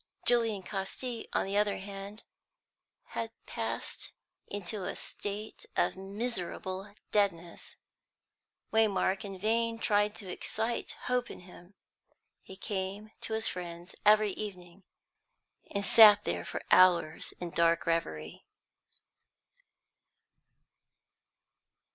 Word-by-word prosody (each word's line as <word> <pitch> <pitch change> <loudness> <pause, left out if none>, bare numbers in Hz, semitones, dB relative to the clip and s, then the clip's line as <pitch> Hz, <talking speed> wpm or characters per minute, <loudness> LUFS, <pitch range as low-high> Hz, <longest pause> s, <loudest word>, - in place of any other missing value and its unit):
Julian 225 -5 +3
Casti, 215 +5 -4
on - - +1
the 195 +1 -3
other 205 -1 +2
hand, 200 +2 -8 0.9
had 230 - -3 0.2
passed - - -4 0.3
into 205 0 -4
a 195 - -3
state 205 +2 -6
of - - +2
miserable 195 -1 -4 0.2
deadness; 175 -5 0 1.0
Waymark 200 -3 +2
in 195 -2 -6
vain 230 +3 +1
tried 210 -1 +2
to 200 - -8
excite 220 +5 -2
hope 250 -1 0
in - - -9
him. 180 +1 -15 0.7
He 190 - -11
came 200 +2 -4
to 220 - -3
his 220 0 +2
friend's 175 0 -5
every 210 0 +6
evening, 185 -2 -8 0.8
and 200 0 -2
sat 210 -2 +9
there - - -2
for - - -5
hours 180 -4 +5
in 175 -1 -4
dark 170 0 +3
reverie. 80 - -2
200 Hz, 105 wpm, -31 LUFS, 185-215 Hz, 1.0 s, sat